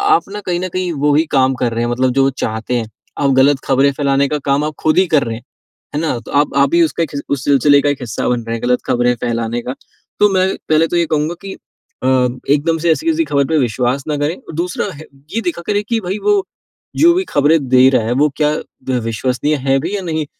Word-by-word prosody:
आप - - 0
ना 210 - -5
कहीं 175 -1 0
न 185 - -3
कहीं 185 -1 -1
वो 145 - +4
ही 160 - +3
काम 130 -1 +3
कर 120 - +1
रहे 115 - -1
हैं, 120 - -2
मतलब 130 +1 +1
जो 135 - +5
वो 135 - +3
चाहते 110 +2 -2
हैं। 110 -2 -4 0.3
आप 140 -1 +2
गलत 140 0 +3
खबरें 135 +1 +3
फैलाने 140 0 +1
का 150 - -1
काम 140 +1 +1
आप 150 0 -2
खुद 155 - +1
ही 185 0 +4
कर 140 - +4
रहे 115 -1 -4
हैं। 120 - -14 0.5
है - - 0
ना? 155 -7 -1
तो 115 - -12
आप 145 0 +1
आप 140 0 +4
भी 170 +2 +4
उसका 165 +1 0
एक 155 - -5
हिस 140 - -3
उस 140 -2 -1
सिलसिले 140 0 +4
का 145 - +1
एक 145 -2 -2
हिस्सा 110 -5 -3
बन 120 -1 0
रहे 115 0 -3
हैं, 115 - -7
गलत 125 0 +1
खबरें 120 0 +2
फैलाने 120 -1 -2
का। 125 +2 -5 0.4
तो 210 0 +5
मैं 185 0 +3 0.2
पहले 155 +1 +3
तो 175 - -1
ये 170 - +2
कहूँगा 155 +2 -1
कि 195 -1 -8 0.5
अ, 130 - +1 0.4
एकदम 150 +3 +2
से 170 - +3
ऐसी 235 - -1
किसी 325 0 +2
ख़बर 140 - +1
पर 160 -1 +1
विश्वास 125 +2 0
ना 150 - -1
करें 145 +4 -1
और - - -18
है - - -7
दूसरा 175 +2 -2
है 155 +2 -11 0.3
ये 230 - 0
देखा 170 0 -2
करें 205 0 +1
कि 230 -1 +1
भई 185 +2 -3
वो 415 - +1 0.7
जो 340 +2 +6
भी 370 +2 0
खबरें 145 0 +2
दे 130 0 +6
रहा 130 -4 +2
है, 115 - -1
वो 145 +4 +2
क्या 150 -1 +2 0.5
विश्वसनीय 125 +6 -1
हैं 135 0 +3
भी 205 - -3
या 195 - -3
नहीं। 160 -3 -2
145 Hz, 260 wpm, -16 LUFS, 130-165 Hz, 0.7 s, जो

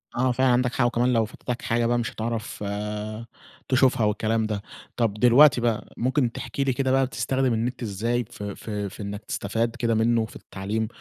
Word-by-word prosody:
آه 125 +1 +2
فعلًا 130 +1 +2
عندَك 125 0 +2
حق، 120 - +3
وكمان 120 +1 +2
لو 115 -1 +3
فاتتَك 120 +2 -5
حاجة 115 0 +1
بقى 120 +1 +2
مش 115 - -2
هتعرف 115 -2 -4 1.1
تشوفها 130 -3 +3
والكلام 110 +1 +1
ده. 105 -2 -2 0.4
طب 115 -4 +2
دلوقتي 125 +4 +6
بقى 115 -3 -1
ممكن 130 0 +1
تحكي 140 - -3
لي 135 -2 +1
كده 130 +1 0
بقى 135 0 +4
بتستخدم 130 0 0
النت 120 +3 -2
إزاي 115 +4 -1
ف 105 - -8
ف 100 +2 -7
في 105 0 -4
إنك 100 +1 -5
تستفاد 115 +3 -2
كده 115 -2 0
منه 115 0 +2
في - - -14
التعليم؟ 105 +3 -3
115 Hz, 185 wpm, -25 LUFS, 110-125 Hz, 1.1 s, دلوقتي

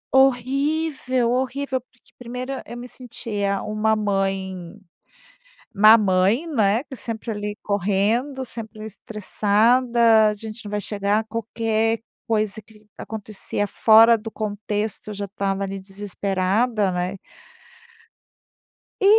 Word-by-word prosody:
Horrível, 265 0 +2
horrível. 260 +1 -1
Porque 250 -1 -29
primeiro 250 +2 -5
e 270 - -4
eu 240 - -6
me 245 +1 -7
sentia 210 -6 -3
uma 215 +1 +1
mãe 195 -2 -2 1.0
má 215 +3 +8
mãe, 200 - +2
né, 225 -4 +2
que 265 - -9
sempre, 230 -1 -5
ali, 210 0 -4
correndo, 210 +7 0
sempre 220 -2 -8
estressada, 220 +2 +3
"A - - -1
gente 220 +1 -8
não 205 - -7
vai 210 - -1
chegar". 205 +2 0
Qualquer 225 0 -1 0.3
coisa 215 -1 0
que 210 0 -21
acontecia 210 -1 -4
fora 225 +3 +6
do 225 +1 -7
contexto, 210 0 -3
eu - - -4
já 200 0 -3
estava 195 0 -2
ali 195 0 -4
desesperada, 200 +2 0
né. 180 +2 -2 1.8
E, - - +2
215 Hz, 120 wpm, -23 LUFS, 200-235 Hz, 1.8 s, má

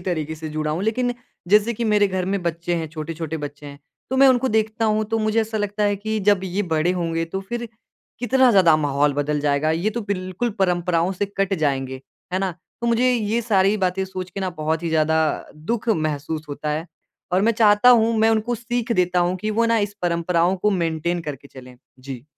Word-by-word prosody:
तरीके 160 -4 -3
से 155 0 -7
जुड़ा 155 0 -2
हूँ 160 +5 -2
लेकिन 245 +3 0 0.3
जैसे 210 +3 +4
कि 235 - -3
मेरे 210 -2 +3
घर 185 -1 -2
में 195 0 -2
बच्चे 170 +1 -2
है, 165 -1 -2
छोट-छोटे 160 0 -5
बच्चे 145 0 -7
हैं 140 0 -10 0.3
तो 265 - 0
मैं 270 0 +7
उनको 260 0 +3
देखता 220 +1 0
हूँ 215 0 +2
तो 225 - +1
मुझे 215 +1 +1
ऐसा 220 0 -2
लगता 205 0 -2
है 205 0 +1
कि 220 +2 -3
जब 205 -1 +3
ये 190 +2 -1
बड़े 160 -1 0
होंगे 165 -2 -1
तो 190 +4 -5
फिर, 235 +4 -5 0.5
कितना 255 +1 +4
ज़्यादा 185 -7 +5
माहौल 145 -1 +1
बदल 145 +1 -1
जाएगा, 145 +1 +1
ये 170 +7 0
तो 235 +2 -3
बिल्कुल 200 +2 -3
परंपराओं 180 -1 +1
से 200 +2 -2
कट 195 0 +1
जाएँगे, 135 -3 -1 0.3
है 185 - +1
ना? 190 -1 -1 0.3
तो 235 - -2
मुझे 240 +2 +3
ये 225 0 0
सारी 200 -2 +3
बातें 190 -1 0
सोच 185 -1 -6
के 195 - -6
ना 190 -1 -1
बहुत 160 0 -2
ही 170 - -2
ज़्यादा 160 0 +2 0.4
दुख 225 +9 -3
महसूस 155 -4 -1
होता 150 +1 -4
है 155 +3 -2 0.5
और 185 +2 +3
मैं 230 +2 +3
चाहता 210 +1 +5
हूँ, 230 -1 +5
मैं 220 +1 +4
उनको 225 +2 0
सीख 235 +1 -2
देता 180 -3 +2
हूँ 175 +1 +1
कि 215 +4 -3
वो 225 +2 +1
ना 230 0 +3
इस 205 -1 -2
परंपराओं 170 +1 +1
को 210 +3 +1
मेंटेन 170 -2 -1
करके 140 -2 -7
चलें। 130 -1 -13 0.2
जी। 130 -1 -8
185 Hz, 215 wpm, -22 LUFS, 160-215 Hz, 0.5 s, मैं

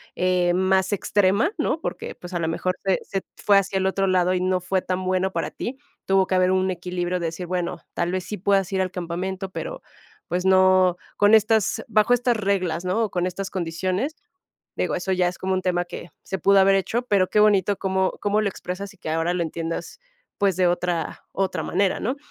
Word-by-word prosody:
eh, 180 -1 +2
más 190 +2 +2
extrema, 205 - +2
¿no? - - 0
Porque, - - -5
pues, 175 +1 -10
a 175 - -1
lo 165 - -1
mejor 185 +2 -1
se 190 -2 +2
se 195 - -3 0.2
fue 200 -1 +4
hacia 195 0 +1
el 190 - 0
otro 195 0 0
lado 185 -1 +2
y 180 - 0
no 185 0 +1
fue 185 +1 0
tan 185 0 -2
bueno 185 +1 +1
para 165 -3 -3
ti. 255 +3 -5 0.3
Tuvo 195 -1 +3
que 185 - 0
haber 185 0 +3
un 190 0 +2
equilibrio 180 0 -3
de 170 - -3
decir: 170 +2 -5
"Bueno, 180 -1 -2
tal 175 - -1
vez 185 0 -2
sí 210 - -5
puedas 195 +1 +1
ir 190 -1 +1
al 185 - -1
campamento, 185 +2 -4
pero, - - -6 0.5
pues, 180 +1 -2
no, 185 -1 +5 0.2
con 205 +1 +5
estas 220 -1 +3
bajo 215 +2 +4
estas 245 -1 +2
reglas", 185 -4 -1
¿no?, 190 +5 +1
o - - -5
con 180 -1 0
estas 190 +2 -4
condiciones. 185 - -2 0.6
Digo, - - -1
eso 190 +2 -2
ya 180 -1 +2
es 175 - -6
como 190 0 -2
un 185 - 0
tema 180 -1 0
que 175 0 -9
se 190 - -4
pudo 195 +3 +5
haber 195 0 +5
hecho. 220 +5 -1
Pero 200 -6 +2
qué 210 - +2
bonito 205 -2 +4
cómo 190 -1 0
cómo 205 +1 +1
lo 215 - +1
expresas 190 +1 -6
y - - -24
que 165 - -5
ahora 165 +2 0
lo 175 - 0
entiendas, 165 - -5 0.4
pues, 195 -3 +2
de 185 - +3
otra 175 -1 -2
otra 185 -4 -1
manera, 190 +3 0
¿no? 255 +6 -1
185 Hz, 220 wpm, -23 LUFS, 180-195 Hz, 0.6 s, no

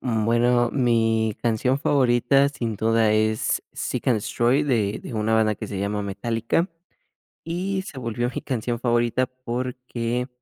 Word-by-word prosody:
Bueno, 120 +1 +2
mi 115 -4 +1
canción 120 +3 +1
favorita 135 -1 +3
sin 115 -6 -4
duda 110 0 +2
es 110 0 +1
Seek - - -3
and 125 - +4
destroy, 120 +6 +1
de 110 -8 0
de - - -7
una 110 +1 +1
banda 110 -1 +3
que - - -7
se 100 - -5
llama 100 +1 -2
Metallica. 115 - -1 0.8
Y 185 +4 -2
se 145 - -10
volvió 120 0 -2
mi - - -4
canción 120 -2 -2
favorita 120 +1 +1
porque 125 -1 -4
120 Hz, 145 wpm, -24 LUFS, 110-130 Hz, 0.8 s, and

